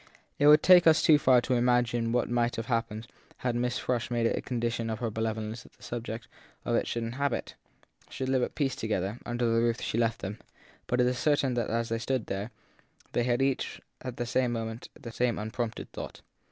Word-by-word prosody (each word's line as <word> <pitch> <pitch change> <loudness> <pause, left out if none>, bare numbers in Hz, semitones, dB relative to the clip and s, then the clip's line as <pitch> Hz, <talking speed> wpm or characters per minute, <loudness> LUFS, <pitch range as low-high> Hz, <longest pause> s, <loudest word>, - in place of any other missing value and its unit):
It 145 - +5
would 150 +1 +8
take 180 -2 +7
us 160 -1 +6
too 150 -2 +6
far 130 -4 +5
to 130 - -1
imagine 120 -1 +2
what 120 0 +1
might 120 0 +1
have 115 - -4
hap 115 -1 0
pened 110 +1 -7 0.4
had 125 - +2
Mrs. 125 0 -1
Frush 125 -3 -1
made 120 -1 0
it - - +2
a - - -3
condition 115 -2 -2
of 110 - -2
her 115 -1 -2
benevolence 110 +1 -3
that - - -18
the - - -21
subjects 115 -1 -5 0.4
of - - +1
it - - +1
should 115 - -2
inhabit, 130 +3 -2 0.6
should 130 - -4
live 130 -1 +2
at - - -2
peace 135 -3 0
together, 110 0 -2
under 120 0 -1
the 115 0 +3
roof 115 0 +1
she 115 - -2
left 115 -1 0
them; 100 +3 -5 0.5
but 125 - 0 0.2
certain 145 0 +2
it 120 - 0
is 115 - -1
that - - -6
as 115 +1 -1
they 115 0 -1
stood 125 0 -1
there 100 +3 -4 0.6
they 120 - +1
had 125 +1 +2 0.6
at 125 -2 -6
the 120 - -2
same 125 +1 +1
moment 115 0 -4
the 115 - -8
same 120 0 0
unprompted 110 +2 -4
thought. - - -7
120 Hz, 220 wpm, -29 LUFS, 115-125 Hz, 0.6 s, would